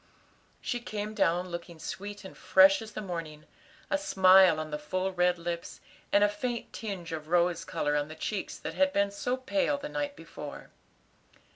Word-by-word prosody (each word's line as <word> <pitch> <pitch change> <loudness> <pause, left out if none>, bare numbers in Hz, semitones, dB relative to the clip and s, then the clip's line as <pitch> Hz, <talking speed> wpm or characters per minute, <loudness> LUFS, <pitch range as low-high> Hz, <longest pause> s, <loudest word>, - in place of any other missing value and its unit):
She 245 - -2
came 215 -2 -5
down 180 -3 +1
looking 170 -1 -7
sweet 200 +5 -7
and 190 - -10
fresh 195 +3 +5
as 220 -1 -9
the 215 - -5
morning; 165 -5 -6 0.5
a 290 - +2
smile 190 - +6
on 155 0 -5
the 150 - -3
full 185 +6 -2
red 180 0 +2
lips, 170 0 -5 0.3
and 205 - +5
a - - +6
faint 235 +3 -4
tinge 195 -7 -5
of 155 -1 -5
rose 175 0 +2
color 155 -5 -1
on 145 0 0
the 155 - -9
cheeks 195 +5 -4
that - - -6
had 285 0 +2
been 200 0 +2
so 245 +5 -2
pale 285 +2 0
the 285 +1 -6
night 290 -1 -3
before. 150 -3 -9
185 Hz, 180 wpm, -29 LUFS, 170-215 Hz, 0.5 s, smile